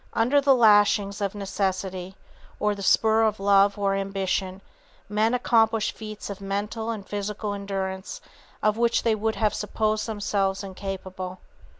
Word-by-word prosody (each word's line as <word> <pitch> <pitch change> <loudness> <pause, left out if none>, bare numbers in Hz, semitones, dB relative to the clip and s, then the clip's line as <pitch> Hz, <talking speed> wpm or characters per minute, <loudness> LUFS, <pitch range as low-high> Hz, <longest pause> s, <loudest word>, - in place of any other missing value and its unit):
Under 255 +6 +3
the 275 -1 +5
lashings 205 -3 +4
of 200 0 -2
necessity, 190 -2 -3 0.4
or 210 0 +1
the 200 - -8
spur 220 +3 +4
of 215 -2 +1
love 200 0 +4
or 200 -1 +1
ambition, 195 -1 -2 0.5
men 215 +3 +1
accomplish 225 -3 +2
feats 215 -1 -8
of 200 -1 -7
mental 205 +3 -3
and 215 -4 -5
physical 205 0 -3
endurance 195 -1 -4 0.4
of 215 0 +2
which 235 0 +2
they 230 - +3
would 220 +1 -1
have 215 -2 +1
supposed 215 +1 -1
themselves 200 -2 -1
incapable. 190 -1 -6
205 Hz, 140 wpm, -25 LUFS, 195-220 Hz, 0.5 s, the